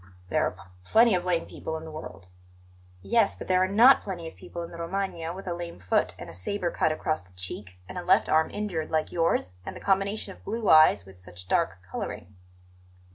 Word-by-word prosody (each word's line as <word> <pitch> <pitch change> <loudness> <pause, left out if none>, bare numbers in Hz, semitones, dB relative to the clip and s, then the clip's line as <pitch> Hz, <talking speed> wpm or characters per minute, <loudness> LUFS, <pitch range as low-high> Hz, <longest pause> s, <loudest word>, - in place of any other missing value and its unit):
"There - - +2
are - - -4
p 90 - -15 0.2
plenty 225 - +5
of 180 -1 0
lame 175 -2 +1
people 160 - -5
in 160 - -9
the 160 - -8
world." 95 - -9 0.7
"Yes, 100 0 +3
but - - -9
there 185 0 +3
are 185 - +3
not 230 +8 +7
plenty 175 -4 -6
of - - -10
people 170 - -7
in 170 - -8
the 170 - -9
Romagna 170 -1 -3
with 190 +3 -8
a 175 - -1
lame 170 - -7
foot 90 +1 +1
and - - -8
a - - -10
sabre 175 - -2
cut 155 - +1
across 155 -3 -1
the 90 +1 -21
cheek 90 +1 -5
and 105 - -6
a - - -6
left 180 - +4
arm 160 0 +3
injured 185 -7 -3
like 155 -1 0
yours, 165 - +1
and - - -7
the - - -8
combination 195 +1 0
of - - -20
blue 220 0 -3
eyes 155 -11 +7
with 95 -1 -15
such 90 0 -12
dark 95 0 0
colouring." 95 +1 -6
165 Hz, 225 wpm, -27 LUFS, -, 0.7 s, not